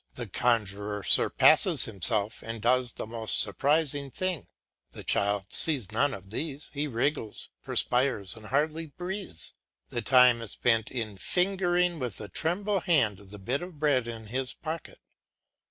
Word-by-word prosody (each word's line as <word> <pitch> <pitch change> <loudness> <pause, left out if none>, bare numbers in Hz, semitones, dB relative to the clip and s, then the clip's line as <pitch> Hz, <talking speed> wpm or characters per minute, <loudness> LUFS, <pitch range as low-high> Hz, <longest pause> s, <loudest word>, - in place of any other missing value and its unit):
The 120 -2 -5
conjuror 105 -2 -1
surpasses - - +5
himself 105 +1 -1
and 115 0 -5
does 125 +2 +1
the - - -6
most 110 0 +1
surprising 145 +5 0
things. 185 0 -3 0.5
The - - -9
child 100 -1 0
sees 130 - +4
none 135 +5 +1
of 95 0 -13
these; 145 +4 -5
he 150 +1 -2
wriggles, 125 -2 -3
perspires, 125 -6 0
and 110 -1 -11
hardly 155 +5 -1
breathes; 180 - -3 0.4
the 120 - -3
time 125 -2 +5
is 115 - -4
spent 115 -2 +1
in 110 -5 -5
fingering 180 - +1
with 125 -7 -5
a 105 - -7
trembling 190 - 0
hand 105 - +1
the 105 - -10
bit 120 - -2
of 175 -3 -9
bread 140 -5 +1
in 115 -1 -7
his 125 +4 -2
pocket. 160 0 -7
125 Hz, 150 wpm, -28 LUFS, 110-155 Hz, 0.5 s, surpasses